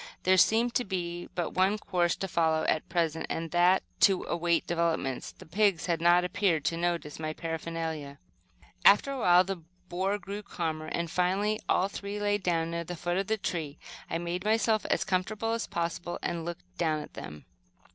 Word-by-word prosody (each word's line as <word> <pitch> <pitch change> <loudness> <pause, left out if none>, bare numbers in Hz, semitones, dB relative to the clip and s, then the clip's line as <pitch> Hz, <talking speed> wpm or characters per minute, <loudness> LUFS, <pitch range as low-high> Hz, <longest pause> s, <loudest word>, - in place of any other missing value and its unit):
There 185 +1 +5
seemed 225 +6 +4
to 250 - +2
be 175 -3 -4
but 175 - -1
one 190 +3 +2
course 175 -4 0
to 195 - -4
follow, 160 -2 +1
at 155 - 0
present, 165 -2 0
and 165 0 -3
that 175 +2 +4 0.2
to 195 -3 +4
await 170 -1 0
developments. 165 -6 -1
The - - -15
pigs 195 0 +2
had 170 -2 0
not 175 +1 +5
appeared 180 -4 +1
to 165 - +1
notice 170 -3 -2
my 155 -1 -3
paraphernalia. 165 -3 -4 0.7
After 210 +7 +6
a 275 - -3
while 180 -4 +6
the 195 0 -3 0.3
boar 190 +3 0
grew 200 +1 -6
calmer, 160 -5 -4
and 170 0 -3
finally 195 +4 +1
all 185 - +3
three 200 +1 -5
lay 205 0 +1
down 165 -3 0
near 170 0 -2
the 175 +2 -6
foot 175 +2 -2
of 195 0 -1
the 220 - +1
tree. 165 -7 -3 0.3
I 165 - -1
made 175 +1 -3
myself 220 0 +2
as - - +1
comfortable 205 +4 -1
as 230 0 -1
possible, 170 +1 -3
and 170 -1 -2
looked 90 - -8
down 155 -2 +1
at - - -11
them. 75 0 -9
175 Hz, 185 wpm, -29 LUFS, 165-195 Hz, 0.7 s, After